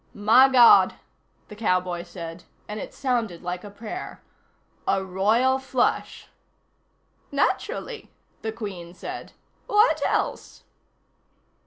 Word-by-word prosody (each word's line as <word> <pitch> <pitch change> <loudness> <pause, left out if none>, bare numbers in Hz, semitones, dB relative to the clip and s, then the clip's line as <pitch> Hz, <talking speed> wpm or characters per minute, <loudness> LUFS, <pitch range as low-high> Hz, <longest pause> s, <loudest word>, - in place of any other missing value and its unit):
"My 225 +6 +6
God," 245 -3 +7 0.5
the 210 - -11
cowboy 180 -4 0
said, 170 -1 -9 0.2
and 210 +1 -5
it - - -7
sounded 230 -10 -2
like 180 0 -4
a 205 - -8
prayer. 210 +2 -7 0.7
"A 190 - +1
royal 220 +8 +2
flush." 265 -2 -1 1.0
"Naturally," 475 0 -2 0.3
the 220 - -3
Queen 190 -6 -7
said. - - -8 0.3
"What 420 +3 +3
else?" - - -2
210 Hz, 105 wpm, -25 LUFS, 180-250 Hz, 1.0 s, God